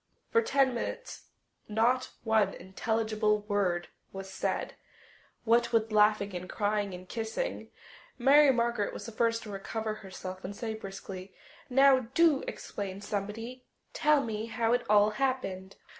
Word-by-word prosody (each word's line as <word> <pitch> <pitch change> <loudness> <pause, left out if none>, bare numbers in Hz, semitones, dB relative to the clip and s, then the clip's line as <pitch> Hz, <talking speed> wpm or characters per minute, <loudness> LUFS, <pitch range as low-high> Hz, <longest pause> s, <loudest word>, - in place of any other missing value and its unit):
For 460 - +5
ten 275 - +2
minutes - - -5 0.4
not 235 +4 +2
one 220 -3 +2
intelligible 215 +2 0
word 195 -4 0 0.2
was 195 0 -8
said, - - -2 0.7
what 235 +1 +3
with 225 -1 +2
laughing 210 -2 +3
and 180 +1 -6
crying 205 -2 -1
and 180 +1 -11
kissing. 225 - -3 0.5
Mary 280 +3 +6
Margaret 235 -4 0
was - - -7
the 230 - -6
first 230 +1 +1
to 210 - -8
recover 215 +2 -3
herself 185 -1 -8
and 200 +2 -6
say 220 +1 -4
briskly, 195 -2 -8 0.3
"Now, 265 -1 +5
do 325 -5 +4
explain, 195 -1 -5
somebody. 215 +5 -5 0.3
Tell 300 -2 +3
me 220 -1 -3
how 230 0 +1
it 245 - +2
all 210 0 +5
happened." 210 -7 -2
220 Hz, 140 wpm, -30 LUFS, 200-240 Hz, 0.7 s, Mary